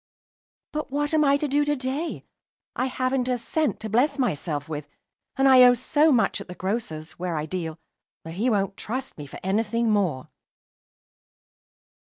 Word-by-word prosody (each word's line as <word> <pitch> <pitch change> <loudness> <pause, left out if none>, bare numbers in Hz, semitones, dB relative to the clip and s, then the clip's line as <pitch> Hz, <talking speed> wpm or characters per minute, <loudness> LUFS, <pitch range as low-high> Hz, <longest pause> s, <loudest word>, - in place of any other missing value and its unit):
"But 305 0 -4
what 290 +2 -1
I - - +4
am 280 -2 +4
to 300 - -1
do 290 +1 +2
to 295 0 +1
day? 270 +5 -3 0.5
I 255 - 0
haven't 255 0 -1
a 250 -1 +1
cent 305 +6 -1
to 220 - -4
bless 265 +7 +2
myself 155 - -1
with; 150 -2 -5 0.5
and 270 0 +3
I 260 -1 +8
owe 245 0 +8
so 295 +6 +3
much 225 -5 +2
at - - -9
the 180 - -8
grocer's, 180 -7 -4
where 175 -2 -2
I 150 - -2
deal, 165 -2 -4 0.5
that 165 - -8
he 215 +8 0
won't 200 -3 0
trust 255 +4 -5
me 145 - -7
for - - -10
any 195 +4 +2
thing 230 +1 0
more." 175 -10 0
235 Hz, 180 wpm, -25 LUFS, 180-270 Hz, 0.5 s, I